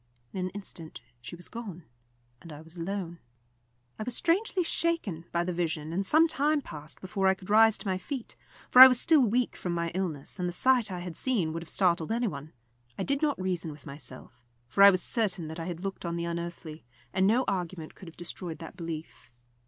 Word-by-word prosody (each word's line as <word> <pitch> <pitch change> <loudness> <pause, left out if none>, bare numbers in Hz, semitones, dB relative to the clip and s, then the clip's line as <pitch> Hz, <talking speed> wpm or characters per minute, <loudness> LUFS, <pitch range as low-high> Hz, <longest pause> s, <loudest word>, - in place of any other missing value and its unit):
In - - -4
an 185 0 -1
instant 180 -4 -7 0.2
she 125 +7 -8
was 175 0 -11
gone, 205 -8 -8 0.6
and 165 - -11
I 150 0 -9
was 160 +2 -13
alone. 175 -1 -4 0.8
I - - -2
was 240 +1 -2
strangely 365 +2 +2
shaken 325 - -1
by 170 0 +1
the 180 +1 -2
vision, 160 -2 -2
and 190 +3 0
some 315 - +5
time 300 0 +2
passed 150 - -10
before 190 +1 0
I 190 - +4
could 190 +1 -9
rise 220 0 +6
to - - -8
my 185 -1 0
feet, 260 +4 -6 0.4
for 250 - +9
I 260 - +15
was 250 -2 +2
still 320 -1 +5
weak 245 +1 +1
from 175 -2 -3
my 170 -1 -1
illness, 180 -3 -4
and 180 0 0
the - - -6
sight 245 +1 +3
I 180 -1 -4
had 175 -2 -6
seen 195 -11 0
would 165 - -4
have 165 - -10
startled 170 -3 +1
any 235 +1 +1
one. 145 -3 -6 0.5
I - - -1
did 280 +1 0
not 295 -6 +1
reason 180 -3 -2
with 145 0 -13
myself, 130 -4 -9 0.2
for 130 +11 0
I 200 - +11
was 185 -2 +1
certain 190 -8 -1
that 160 +2 -7
I 165 - -4
had 175 -1 -5
looked 195 0 -5
on 170 -1 -2
the 170 0 -2
unearthly, 170 -2 -5 0.3
and 190 0 +3
no 240 +5 +3
argument 180 -4 -3
could 185 - -13
have 165 - -12
destroyed 175 -1 -5
that 165 0 -10
belief. 165 -6 -7
180 Hz, 220 wpm, -29 LUFS, 165-225 Hz, 0.8 s, I